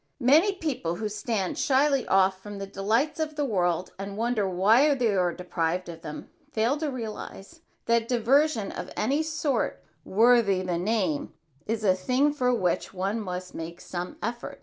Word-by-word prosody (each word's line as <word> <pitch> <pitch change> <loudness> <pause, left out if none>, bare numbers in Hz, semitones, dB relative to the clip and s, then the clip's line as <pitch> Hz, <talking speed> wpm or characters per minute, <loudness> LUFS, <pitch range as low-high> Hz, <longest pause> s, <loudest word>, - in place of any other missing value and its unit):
Many 305 +10 +5
people 260 - -3
who 215 +4 -3
stand 210 -2 -2
shyly 275 -1 +2
off 190 0 +3
from 205 0 -8
the 195 - -4
delights 220 +11 0
of 310 -1 -2
the 295 -1 0
world 180 -6 0
and 200 +1 -6
wonder 225 -3 0
why 225 +11 +4
they 235 -6 +1
are 180 -2 +2
deprived 180 0 -2
of 165 -1 -9
them, 150 -2 -7 0.2
fail 230 +2 +1
to 305 0 -2
realize 230 +3 -7 0.2
that 230 0 +2
diversion 245 -1 +2
of - - -6
any 275 +8 +1
sort 305 -5 -1 0.2
worthy 215 -3 +4
the 175 -2 -1
name, 185 -6 -1 0.3
is 220 0 -2
a 190 -3 +5
thing 255 +10 +1
for 250 -4 +1
which 190 -4 -1
one 195 +4 -1
must 180 -3 -5
make 165 +1 -7
some 175 0 -6
effort. 235 +2 -4
215 Hz, 170 wpm, -27 LUFS, 185-255 Hz, 0.3 s, Many